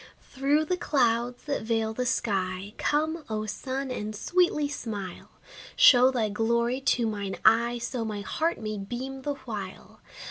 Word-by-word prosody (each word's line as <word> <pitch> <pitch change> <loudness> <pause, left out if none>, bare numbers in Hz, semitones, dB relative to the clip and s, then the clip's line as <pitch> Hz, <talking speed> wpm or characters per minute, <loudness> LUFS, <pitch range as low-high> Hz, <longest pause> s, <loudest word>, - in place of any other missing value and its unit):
Through 285 +3 +2
the 360 +3 -1
clouds 245 -5 +1
that 290 -1 -2
veil 220 0 0
the 250 +2 -2
sky, 195 -3 -1
Come, 315 +2 0
O 215 0 -2
sun, 260 +5 -4
and 215 -3 -4
sweetly 325 - +2
smile! 210 -10 -6 0.5
Show 250 0 +7
thy 240 -4 0
glory 235 +4 0
to 250 -2 +2
mine 200 -3 -3
eye, 235 +1 +5
So 235 0 -3
my 210 -2 -4
heart 320 +11 -1
may 215 -2 -4
beam 255 +6 -5
the 285 +1 -2
while. 205 -5 -7
235 Hz, 150 wpm, -27 LUFS, 215-270 Hz, 0.5 s, Show